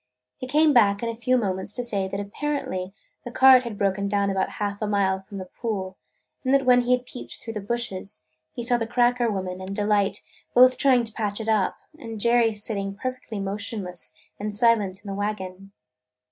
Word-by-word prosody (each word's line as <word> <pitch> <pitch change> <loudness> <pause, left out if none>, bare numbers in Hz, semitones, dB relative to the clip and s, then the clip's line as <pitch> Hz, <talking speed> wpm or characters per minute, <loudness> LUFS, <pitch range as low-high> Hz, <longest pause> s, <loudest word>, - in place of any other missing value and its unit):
He 255 - -6
came 300 +2 +4
back 205 -4 +4
in 230 - -1
a 230 - -4
few 255 +2 +1
moments 190 -4 -2
to 245 - 0
say 200 -5 -1
that 195 +1 -4
apparently 205 -3 -3 0.3
the - - -6
cart 260 +1 +7
had 235 -4 -6
broken 200 0 0
down 200 0 +1
about 190 -1 -1
half 205 0 -3
a 215 - 0
mile 195 -2 +1
from 200 +1 -10
the 185 - -5
pool 190 -2 -4 0.5
and 260 - 0
that 275 -1 +2
when 250 -1 +6
he 245 +1 +2
had 250 0 0
peeped 245 - -8
through 225 - -8
the 210 - -4
bushes 195 - -3 0.3
he 240 - -6
saw 245 0 +2
the 225 -1 -3
"cracker" 245 0 +2
woman 185 -2 -4
and 190 +1 -5
Delight 205 -1 +1 0.3
both 255 +1 +7
trying 255 -3 +4
to 225 -2 -6
patch 205 -2 -2
it 220 - -5
up 215 -4 +2 0.2
and 225 -5 -7
Jerry 235 0 +3
sitting 200 -2 -4
perfectly 255 -2 -5
motionless 195 -2 -5 0.2
and 210 +1 -3
silent 205 -3 +2
in - - -12
the 195 - -3
wagon. 195 -2 -4
210 Hz, 200 wpm, -25 LUFS, 195-240 Hz, 0.5 s, cart